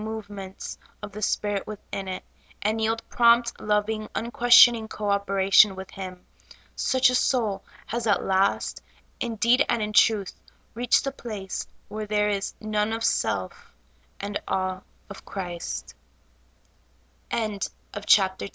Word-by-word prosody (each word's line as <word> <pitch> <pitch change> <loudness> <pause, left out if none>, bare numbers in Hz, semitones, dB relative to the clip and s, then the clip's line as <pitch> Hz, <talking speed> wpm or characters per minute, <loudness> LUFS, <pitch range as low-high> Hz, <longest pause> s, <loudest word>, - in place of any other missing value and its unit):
movements 205 -3 -7 0.3
of 205 - -6
the 210 +2 -8
Spirit 205 -1 -1
within 195 -2 -7
it, 185 0 -5 0.4
and 215 +2 0
3deld 225 +1 0
prompt, 235 0 +4
loving, 215 +1 0
un 235 +1 -3
questioning 240 -1 +6
co 210 -1 -4
operation 195 0 +4
with 190 0 -9
Him. 185 -2 -7 0.6
Such 260 -1 +3
a - - -2
soul 220 -7 +1 0.2
has 235 0 -3
at 205 - +2
last, 195 +1 +1 0.4
in 235 -2 -3
deed 240 +5 +4
and 235 - +2
in 210 0 -3
truth, 210 -2 +3 0.4
reached 240 +1 +2
the 275 - -2
place 210 -7 -6 0.2
where 215 0 -5
there 210 0 +1
is 200 -1 -2
"none 215 0 -1
of 225 0 -3
self 470 - -1 0.5
and 200 0 -3
a 185 -1 -1
210 Hz, 125 wpm, -25 LUFS, 195-230 Hz, 0.6 s, questioning